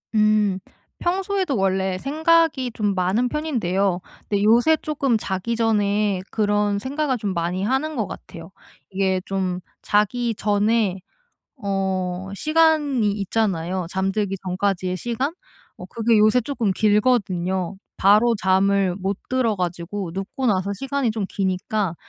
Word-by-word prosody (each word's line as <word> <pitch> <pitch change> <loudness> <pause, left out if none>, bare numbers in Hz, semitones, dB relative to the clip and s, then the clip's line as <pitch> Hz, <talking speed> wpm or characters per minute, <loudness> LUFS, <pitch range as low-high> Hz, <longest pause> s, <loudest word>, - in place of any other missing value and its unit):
음. 210 -3 +3 0.4
평소에도 375 -4 0
원래 190 -1 0
생각이 310 - +2
좀 205 -3 0
많은 190 +7 +1
편인데요 200 - 0 0.3
근데 205 -1 0
요새 240 +9 +5
쪼끔 280 -6 0
자기 205 +3 -3
전에 205 -3 +1
그런 205 -1 +1
생각을 270 +3 -1
좀 205 -4 -3
많이 175 +2 -2
하는 265 +8 0
것 220 -5 0
같아요. 165 +2 -10 0.4
이게 190 -1 0
좀 185 -2 -2 0.2
자기 225 +3 +1
전에 205 -1 +1 0.6
어 190 -3 -2
시간이 305 -5 +2
있잖아요, 190 -4 -1
잠들기 195 +2 -1
전까지의 185 0 -1
시간. 240 - -2 0.5
어 180 - -8
그게 225 +2 +1
요새 215 +4 +4
쪼끔 235 -5 -1
길거든요. 190 -4 +1 0.2
바로 215 +4 +5
잠을 190 -1 +2
못 195 +1 -2
들어 240 -5 +1
가지고 180 +1 -3
눕고 195 +8 -5
나서 195 -1 +1
시간이 270 +2 -1
좀 215 -3 -2
기니까 190 0 -1
205 Hz, 265 characters per minute, -22 LUFS, 190-240 Hz, 0.6 s, 요새